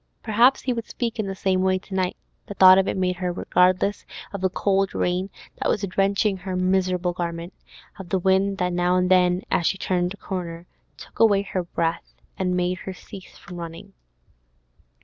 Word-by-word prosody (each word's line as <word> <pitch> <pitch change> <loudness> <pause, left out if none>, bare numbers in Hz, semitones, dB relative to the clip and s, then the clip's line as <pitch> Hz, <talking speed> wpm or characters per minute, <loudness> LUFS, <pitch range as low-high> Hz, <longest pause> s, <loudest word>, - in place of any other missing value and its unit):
Perhaps 235 +4 +3
he 255 - 0
would 230 -1 -5
speak 235 -2 -4
in 210 - -1
the 195 - -4
same 190 -1 0
way 185 0 +2
to 190 +1 -11
night; 185 -1 -1 0.3
the 205 - -7
thought 185 0 +8
of 195 - +1
it - - -2
made 180 -1 0
her 180 -1 -2
regardless 180 +3 +1 0.3
of 200 - -5
the 190 - +2
cold 195 +1 0
rain 180 +2 -1 0.3
that - - -1
was 205 - 0
drenching 195 +1 +1
her 185 0 -5
miserable 185 -1 +1
garment, 170 0 -5 0.5
of 190 -2 -9
the 190 - +1
wind 190 +2 +2
that 180 -1 -1
now 175 +1 +1
and 180 0 +1
then, 180 0 +3
as 170 - +2
she 195 - 0
turned 180 -1 -1
a 200 - -8
corner, 175 -4 -6 0.3
took - - -14
away 205 -3 +4
her 190 -2 -3
breath, 170 -1 -3 0.2
and 180 -1 -1
made 180 +1 -1
her 190 - -6
cease 190 0 -12
from 180 -3 -11
running. 165 -1 -9
185 Hz, 195 wpm, -23 LUFS, 180-195 Hz, 0.5 s, thought